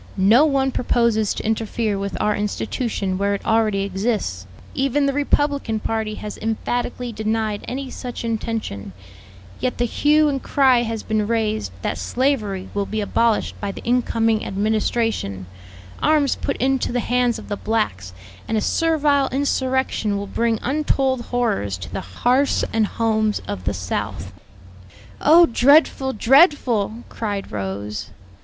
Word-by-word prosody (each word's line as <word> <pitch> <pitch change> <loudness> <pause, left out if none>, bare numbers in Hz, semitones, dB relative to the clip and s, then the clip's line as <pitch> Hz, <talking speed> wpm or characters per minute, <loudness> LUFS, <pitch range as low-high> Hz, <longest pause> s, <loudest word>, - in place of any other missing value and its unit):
No 215 +10 +5
one 270 -3 +1
proposes 235 -4 +1
to - - -5
interfere 220 -1 -1
with 200 0 -4
our 210 0 +1
institution 205 -2 -2
where 200 0 +1
it - - -8
already 220 -3 +2
exists 195 - -2 0.3
even 275 +1 +1
the 275 - +1
Republican 285 -5 0
party 220 0 -2
has 210 0 -7
emphatically 240 +2 -2
denied 215 -1 -2
any 265 +1 -4
such 245 -2 -6
intention 220 - -3 0.7
yet 255 - -1
the 240 - +1
hue 300 +5 +3
and 275 -2 -1
cry 260 -3 +3
has 225 -2 -3
been 215 -1 0
raised 220 - -1
that - - -2
slavery 220 -8 -1
will 200 -1 -1
be 220 - -3
abolished 220 +2 +1
by 200 -1 -2
the - - -10
incoming 230 -2 +1
administration, 210 - -1 0.6
arms 300 -3 +3
put - - -3
into 265 0 0
the 245 - 0
hands 245 -1 +1
of - - -10
the 205 - -2
blacks, 200 - -2 0.4
and 220 - 0
a - - +1
servile 295 -1 +2
insurrection 260 -5 0
will 200 - -4
bring 230 +2 0
untold 270 -2 0
horrors 210 - -1
to 90 -1 -9
the 95 - -3
hearths 245 - +1
and 220 -1 +2
homes 220 -1 0
of 95 -2 -5
the 100 - 0
South." 90 0 -4 0.9
"Oh, 335 +4 +7
dreadful, 265 0 +3
dreadful!" 240 - +3
cried 205 -3 -4
Rose. 100 +1 -4
225 Hz, 145 wpm, -21 LUFS, 205-260 Hz, 0.9 s, Oh